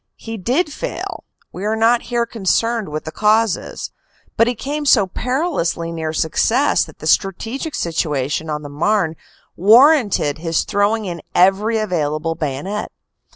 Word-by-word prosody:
He 225 0 -7
did 265 - 0
fail - - -5 0.3
we 185 - -7
are 215 +1 0
not 230 +2 +3
here 240 -1 +1
concerned 230 0 0
with 155 +1 -4
the 155 - -5
causes 215 +2 0 0.4
but 230 - +4
he 245 - 0
came 290 +6 -4
so 215 -7 +5
perilously 220 - -2
near 160 -1 -3
success 225 - +2
that - - -15
the - - -10
strategic 225 - 0
situation 155 -2 -2
on 150 0 -3
the 145 - -7
Marne 165 +3 0 0.4
warranted 220 - +4
his 165 -1 0
throwing 210 +1 0
in 170 -3 -5
every 195 +5 +3
available 165 -6 -1
bayonet. 160 +6 -4
205 Hz, 145 wpm, -19 LUFS, 165-230 Hz, 0.4 s, so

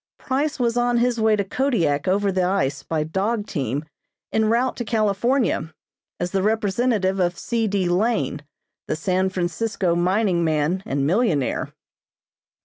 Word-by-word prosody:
Price 280 +3 -1
was 240 -1 +1
on 240 0 +2
his 240 0 +1
way 220 -1 +4
to 200 - 0
Kodiak 190 - 0
over 200 +2 +2
the 190 0 0
ice 180 -7 0
by 160 -2 -2
dog 205 +7 -1
team 140 - -3 0.5
en 220 0 +2
route 235 +4 +1
to 240 - -2
California, 220 - +1 0.5
as 175 0 -2
the 195 - +1
representative 210 -1 +1
of 175 -1 +1
C. 230 -2 -1
D. 195 -3 0
Lane, 175 - 0 0.5
the - - -1
San 185 +4 0
Francisco 185 +1 -1
mining 180 0 +1
man 160 +3 +1
and 140 0 0
millionaire. 170 - +1
195 Hz, 145 wpm, -22 LUFS, 170-230 Hz, 0.5 s, way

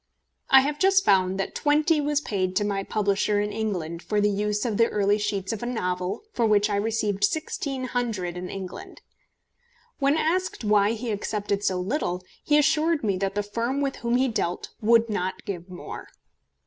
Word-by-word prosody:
I 265 - +8
have 290 +2 -2
just 385 0 +4
found 190 -1 +3
that 195 - -2
£20 300 +1 +2
was 295 0 +1
paid 185 -7 -2
to 205 - +2
my 200 -1 -1
publisher 205 0 +1
in 210 0 -1
England 180 -7 -3
for 210 +2 -1
the 205 0 +3
use 210 +2 -1
of 220 -4 -1
the 230 - +5
early 205 0 +1
sheets 205 0 -2
of 220 - -5
a 240 - -3
novel 180 - -2
for 240 - 0
which 210 0 +3
I - - +1
received 210 -2 -1
£1600 245 - -2
in 180 0 -5
England. 195 - -8 1.0
When 280 +2 +3
asked 360 -1 0
why 210 0 +3
he 230 0 -4
accepted 205 -1 -2
so 185 -2 +1
little, 180 - -2 0.2
he 295 - +3
assured 310 +1 +2
me 200 -3 +1
that 195 +1 -2
the 205 - 0
firm 230 +6 -2
with 275 -1 -1
whom 235 0 0
he 260 +2 +3
dealt 180 -7 -2
would 230 +1 +4
not 190 -3 -3
give 180 -2 -5
more. 180 - -8
210 Hz, 185 wpm, -25 LUFS, 195-255 Hz, 1.0 s, I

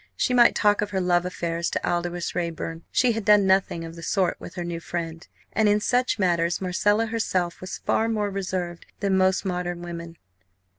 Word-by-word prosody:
She 250 - +1
might 240 -1 +6
talk 205 -1 +3
of 210 - -1
her 195 -2 -1
love 180 -1 +2
affairs 170 -1 -2
to - - -2
Aldous 175 0 -1
Raeburn; 165 -1 -3
she 250 -1 +3
had 225 -1 -2
done 210 -1 +5
nothing 190 -3 +2
of 165 0 -9
the 170 - -9
sort 185 +2 +1
with 175 - -10
her 175 - -3
new 170 -1 -4
friend. 165 0 -5 0.3
And 215 -1 +3
in 205 +1 +3
such 245 +4 +1
matters 175 -3 +1
Marcella 205 +4 +1
herself 190 -6 -1
was 185 0 -5
far 225 +1 0
more 210 -2 -1
reserved 185 -3 -4
than 200 -2 +2
most 190 +1 +2
modern 175 -1 -3
women. 170 -1 -7
180 Hz, 195 wpm, -25 LUFS, 170-205 Hz, 0.3 s, might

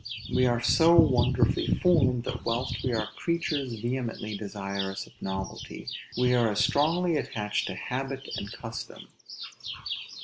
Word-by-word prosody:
We 125 0 +4
are 120 -1 +2
so 165 +1 +6
wonderfully 125 -6 +4
formed, 130 -9 +4
that, 125 -1 -4
whilst 120 0 -1
we 130 - 0
are 110 -2 0
creatures 150 -7 -1
vehemently 120 -3 -3
desirous 100 -1 -4
of - - -18
novelty, 95 -1 -5 0.3
we 125 0 +3
are 120 -2 +4
as 105 - -1
strongly 165 +3 +2
attached 105 -7 -2
to - - -4
habit 135 +1 -4
and 100 - -5
custom. 115 -1 -7
125 Hz, 135 wpm, -28 LUFS, 110-135 Hz, 0.3 s, so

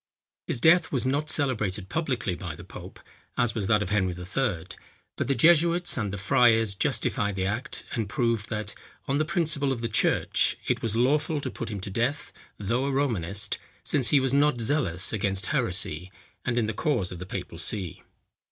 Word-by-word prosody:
His 120 - -1
death 165 +5 +5
was 130 -3 0
not 145 +4 0
celebrated 110 -11 0
publicly 130 - -1
by 85 -3 -6
the - - -11
pope, - - -11 0.4
as 120 -2 +2
was 105 -5 -2
that 105 -1 +3
of 100 - -6
Henry 95 -4 +1
III., 90 0 -2 0.5
but - - -2
the 140 - +1
jesuits 170 +2 +4
and 105 -6 -2
the 100 - -4
friars 115 0 +4
justified 100 +1 0
the 95 -1 -1
act, 115 +10 -3
and 110 -4 -2
proved 115 -3 0
that, 110 -1 -3 0.3
on 140 +1 +1
the 155 - +2
principles 155 -5 +1
of 120 - -6
the 115 - -1
church, 110 - +1
it - - 0
was 115 -2 -1
lawful 145 +5 +2
to 130 -3 -4
put - - -5
him 105 -3 -4
to 100 - -6
death, 125 +8 -1 0.2
though 115 +6 -1
a 140 - 0
Romanist, 105 -9 0 0.2
since 135 -5 +3
he 145 - +5
was 135 0 0
not 140 -2 +3
zealous 115 - +1
against 95 -2 0
heresy, 90 +5 -1 0.3
and 120 -1 0
in 115 - +2
the 110 - -2
cause 105 - 0
of 90 - -7
the 90 - -7
papal 90 -3 -6
see. 90 0 -2
115 Hz, 190 wpm, -27 LUFS, 100-140 Hz, 0.5 s, death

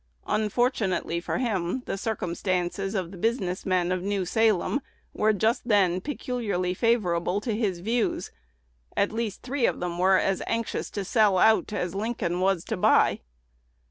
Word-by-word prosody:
Unfortunately 215 -5 0
for 170 - -3
him, 220 -2 -1
the - - -2
circumstances 195 -1 -2
of 180 -3 -2
the 190 - -10
business 195 -5 -1
men 180 -1 +1
of 185 -1 0
New 195 0 -1
Salem 220 +6 +2 0.3
were 215 +1 +2
just 220 +3 0
then 190 -5 +3
peculiarly 220 -10 -2
favorable 185 -4 +1
to 220 0 -2
his 200 -6 -1
views. 230 +4 -1 0.7
At 200 - +2
least 220 -2 -3
three 260 -1 +1
of - - -2
them 175 -1 -3
were 190 +1 +5
as 195 0 0
anxious 230 -1 -2
to 200 -2 -4
sell 210 -2 +3
out 220 +3 +4
as 180 -4 -2
Lincoln 195 -4 -2
was 190 -2 +1
to - - -3
buy. - - +4
200 Hz, 155 wpm, -26 LUFS, 180-225 Hz, 0.7 s, were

